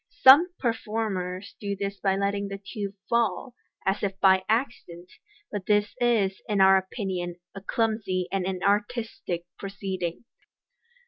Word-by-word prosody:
Some 290 Hz, +7 st, +9 dB
performers 210 Hz, -5 st, -2 dB
do 200 Hz, -1 st, -3 dB
this 200 Hz, 0 st, -4 dB
by 195 Hz, -1 st, +1 dB
letting 200 Hz, +1 st, -1 dB
the 195 Hz, 0 st, -5 dB
tube 200 Hz, 0 st, -6 dB
fall, 235 Hz, +1 st, 0 dB, 0.3 s
as 195 Hz, +2 st, +1 dB
if 195 Hz, -1 st, -2 dB
by 190 Hz, -1 st, +5 dB
accident, 215 Hz, -7 st, -2 dB, 0.4 s
but 200 Hz, -3 st, -5 dB
this 210 Hz, 0 st, +2 dB
is, 210 Hz, -6 st, +2 dB
in 205 Hz, -2 st, +1 dB
our 190 Hz, 0 st, +7 dB
opinion, 190 Hz, -2 st, -2 dB, 0.2 s
a 195 Hz, -, -8 dB
clumsy 200 Hz, -4 st, -1 dB
and 195 Hz, -1 st, 0 dB
inartistic 200 Hz, -1 st, -1 dB
proceeding. 190 Hz, -1 st, -4 dB
200 Hz, 130 wpm, -26 LUFS, 190-215 Hz, 0.4 s, Some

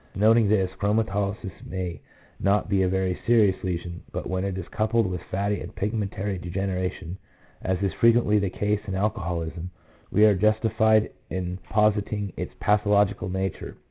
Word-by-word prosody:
Noting 110 Hz, +1 st, +4 dB
this, 95 Hz, -3 st, +2 dB
chromatolysis 100 Hz, -1 st, 0 dB
may 90 Hz, -3 st, -5 dB, 0.4 s
not 100 Hz, +1 st, +2 dB
be 100 Hz, -1 st, +2 dB
a 95 Hz, -, +2 dB
very 95 Hz, -1 st, -1 dB
serious 110 Hz, -5 st, +4 dB
lesion, 85 Hz, -1 st, -4 dB
but -, -, -4 dB
when 95 Hz, 0 st, -1 dB
it 100 Hz, -1 st, -2 dB
is 95 Hz, -, -5 dB
coupled 110 Hz, +1 st, +1 dB
with 90 Hz, -2 st, -3 dB
fatty 100 Hz, +2 st, -1 dB
and -, -, -8 dB
pigmentary 100 Hz, -2 st, -2 dB
degeneration, 90 Hz, 0 st, -3 dB, 0.4 s
as 95 Hz, 0 st, 0 dB
is 100 Hz, -, 0 dB
fre 115 Hz, -, +3 dB
quently 115 Hz, -3 st, +4 dB
the 100 Hz, -, 0 dB
case 105 Hz, +2 st, -1 dB
in 95 Hz, -, -3 dB
alcoholism, 90 Hz, -5 st, -2 dB, 0.4 s
we 105 Hz, -, +5 dB
are 105 Hz, -, +6 dB
justified 110 Hz, +2 st, +3 dB, 0.2 s
in 90 Hz, 0 st, -3 dB
positing 105 Hz, -1 st, +1 dB
its -, -, -5 dB
pathological 105 Hz, -2 st, +2 dB
nature. 95 Hz, 0 st, -3 dB
100 Hz, 155 wpm, -25 LUFS, 95-105 Hz, 0.4 s, are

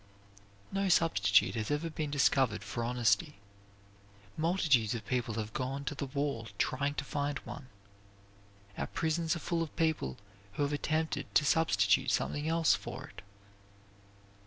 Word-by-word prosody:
No 195 Hz, 0 st, 0 dB
substitute 100 Hz, -, +4 dB
has 110 Hz, -2 st, -3 dB
ever 145 Hz, +2 st, 0 dB
yet 165 Hz, -, -5 dB
been 155 Hz, -2 st, -2 dB
discovered 130 Hz, -6 st, +2 dB
for 100 Hz, +4 st, -4 dB
honesty. 120 Hz, +2 st, +1 dB, 1.0 s
Multitudes 155 Hz, -, +2 dB
of 110 Hz, -2 st, -6 dB
people 120 Hz, -2 st, -1 dB
have 110 Hz, -1 st, -4 dB
gone 135 Hz, +2 st, -3 dB
to -, -, -2 dB
the 140 Hz, -1 st, -4 dB
wall 140 Hz, -4 st, -2 dB
trying 140 Hz, +6 st, 0 dB
to 140 Hz, -, -2 dB
find 145 Hz, 0 st, -2 dB
one. 125 Hz, +2 st, -8 dB, 1.1 s
Our -, -, -1 dB
prisons 160 Hz, 0 st, 0 dB
are -, -, -4 dB
full 170 Hz, 0 st, -1 dB
of 165 Hz, -, -4 dB
people 160 Hz, -, 0 dB, 0.4 s
who 145 Hz, -, -1 dB
have 145 Hz, +1 st, 0 dB
attempted 155 Hz, -1 st, -2 dB
to 150 Hz, -, +5 dB
substitute 100 Hz, -11 st, +3 dB
something 145 Hz, +1 st, 0 dB
else 165 Hz, -1 st, +4 dB
for 125 Hz, +4 st, -5 dB
it. -, -, -12 dB
140 Hz, 150 wpm, -32 LUFS, 115-155 Hz, 1.1 s, to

